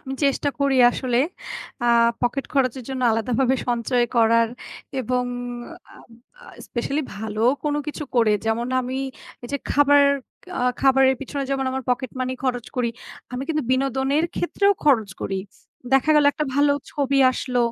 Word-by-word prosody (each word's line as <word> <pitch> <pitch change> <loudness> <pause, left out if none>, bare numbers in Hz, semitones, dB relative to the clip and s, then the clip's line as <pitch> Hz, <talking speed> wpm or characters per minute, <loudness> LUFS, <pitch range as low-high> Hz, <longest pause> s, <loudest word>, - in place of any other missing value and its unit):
আমি 265 - -5
চেষ্টা 280 +1 +1
করি 280 -1 +2
আসলে 245 -1 -2 0.7
আ 240 - +1 0.3
পকেট 250 +3 -1
খরচের 260 -3 0
জন্য 260 -1 -3
আলাদাভাবে 250 +3 +1
সঞ্চয় 240 +1 +1
করার 230 0 +4 0.5
এবং 250 +1 -1 0.7
আ - - -16 0.5
আ - - -15 0.2
especially 275 +5 -3
ভালো 215 0 -4 0.2
কোনো 295 0 0
কিছু 300 0 -5
করে, 230 -3 +4
যেমন 225 +2 0
আমি 255 +1 -4 0.5
এই - - -7
যে - - +1
খাবার 285 0 +5 0.6
আ - - -1 0.2
খাবারের 265 -1 +4
পিছনে 275 +1 -4
যেমন 270 -1 0
আমার 265 0 -3
পকেট 250 +1 0
মানি 255 0 -1
খরচ 245 -2 -1
করি, 245 -2 +1 0.4
আমি 250 +1 -3
কিন্তু 305 -2 0
বিনোদনের 270 +3 +1
ক্ষেত্রেও 400 +3 +2
খরচ 230 -8 +3
করি। 195 - -2 0.6
দেখা 270 +3 +4
গেলো 295 -1 +5
একটা 305 0 -2
ভালো 285 0 +4 0.2
ছবি 275 -2 0
আসলো, 250 -1 -2
260 Hz, 150 wpm, -23 LUFS, 240-280 Hz, 0.7 s, খাবার